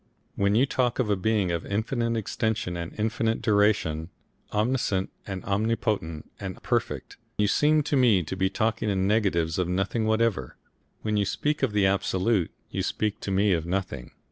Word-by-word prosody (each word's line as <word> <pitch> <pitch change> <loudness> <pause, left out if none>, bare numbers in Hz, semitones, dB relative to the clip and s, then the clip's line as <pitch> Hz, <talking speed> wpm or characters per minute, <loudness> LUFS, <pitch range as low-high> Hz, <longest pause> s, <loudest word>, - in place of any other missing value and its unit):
When 100 +1 +2
you 125 +5 +5
talk 125 -3 0
of 115 -5 +1
a - - +4
being 100 -2 +1
of 85 -1 -2
infinite 115 +3 -1
extension 110 -3 -1
and 85 -1 -4
infinite 110 +1 0
duration, 100 -7 +2 0.4
omniscient 105 -3 0 0.2
and 95 -2 -5
omnipotent 100 -6 -1
and 95 -2 -6
Perfect, - - -2 0.2
you 105 - +3
seem 150 +7 +3
to 145 - -1
me 115 -9 +4
to 80 - -5
be 95 0 +1
talking 110 +1 0
in 95 -1 +1
negatives 95 -6 +1
of 90 - +1
nothing 95 +5 0
whatever. 110 - 0 0.5
When 105 -1 0
you 100 - +2
speak 150 +9 -1
of 135 -5 +2
the 105 -1 +2
Absolute 95 0 +1 0.2
you - - -2
speak 105 -1 -1
to - - -5
me 100 +1 +3
of 85 -1 -1
nothing. 90 -9 -3
105 Hz, 170 wpm, -26 LUFS, 95-110 Hz, 0.5 s, you